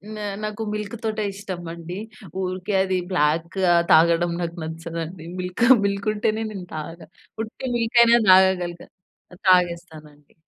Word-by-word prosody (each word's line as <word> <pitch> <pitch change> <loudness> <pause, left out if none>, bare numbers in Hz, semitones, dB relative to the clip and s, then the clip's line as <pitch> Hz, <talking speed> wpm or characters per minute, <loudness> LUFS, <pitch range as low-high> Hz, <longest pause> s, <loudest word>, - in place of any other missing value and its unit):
నా 210 - -6 0.2
నాకు 215 +1 -4
మిల్క్‌తోటే 215 +1 -3
ఇష్టమండి. 175 -3 -7 0.4
ఊరికే 185 +2 -3
అది 190 -1 0
బ్లాక్ 165 +2 0
ఆహ్, 170 0 +4
తాగడం 170 +1 +5
నాకు 170 0 -4
నచ్చదండి. 165 +1 -6
మిల్క్ 180 +5 -1 0.2
మిల్క్ 200 +1 -2
ఉంటేనే 215 +1 -1
నేను 190 -4 -8
తాగుతా. 155 +1 -7 0.4
ఉట్టి 245 +3 -6
మిల్క్ 230 +1 -1
అయినా 235 0 +6
తాగగలుగు 185 -2 +3 0.5
ఆ! - - -11
తాగేస్తానండి. 170 -5 0
180 Hz, 125 wpm, -23 LUFS, 170-210 Hz, 0.5 s, అయినా